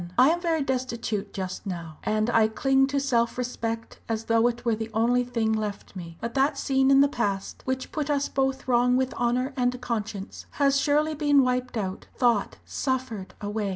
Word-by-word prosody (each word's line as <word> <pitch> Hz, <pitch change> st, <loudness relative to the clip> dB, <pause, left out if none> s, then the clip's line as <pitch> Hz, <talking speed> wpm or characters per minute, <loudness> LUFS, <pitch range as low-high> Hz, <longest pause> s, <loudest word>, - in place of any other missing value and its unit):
I 260 Hz, +5 st, +7 dB
am 345 Hz, +1 st, -1 dB
very 325 Hz, -4 st, +1 dB
destitute 235 Hz, -6 st, -2 dB
just 190 Hz, +1 st, -5 dB
now 170 Hz, -4 st, -6 dB
and 215 Hz, 0 st, +1 dB
I 225 Hz, -2 st, +5 dB
cling 270 Hz, +4 st, +2 dB
to 280 Hz, 0 st, 0 dB
self 235 Hz, -4 st, +1 dB
respect 230 Hz, -2 st, -4 dB
as 225 Hz, 0 st, -1 dB
though 230 Hz, +1 st, +3 dB
it 240 Hz, 0 st, -3 dB
were 230 Hz, -, +3 dB
the 220 Hz, +1 st, -3 dB
only 245 Hz, +3 st, +3 dB
thing 230 Hz, -3 st, 0 dB
left 210 Hz, -2 st, -4 dB
me. 170 Hz, -2 st, -8 dB
But 230 Hz, +1 st, -4 dB
that 275 Hz, +1 st, +2 dB
scene 265 Hz, -1 st, +2 dB
in 275 Hz, 0 st, +7 dB
the 280 Hz, -, +6 dB
past, 200 Hz, -8 st, -2 dB
which 260 Hz, 0 st, -3 dB
put 300 Hz, -1 st, -2 dB
us 285 Hz, -1 st, +1 dB
both 270 Hz, -1 st, -1 dB
wrong 250 Hz, 0 st, +3 dB
with 260 Hz, 0 st, 0 dB
honour 250 Hz, +3 st, 0 dB
and 250 Hz, -1 st, 0 dB
conscience, 215 Hz, -5 st, -5 dB
has 275 Hz, -1 st, +3 dB
surely 300 Hz, +2 st, +2 dB
been 290 Hz, -2 st, +4 dB
wiped 250 Hz, -1 st, -1 dB
out 190 Hz, -3 st, -4 dB
thought 235 Hz, -5 st, +2 dB
suffered 260 Hz, -7 st, -3 dB
away. 205 Hz, 0 st, -2 dB
245 Hz, 190 wpm, -26 LUFS, 220-270 Hz, -, I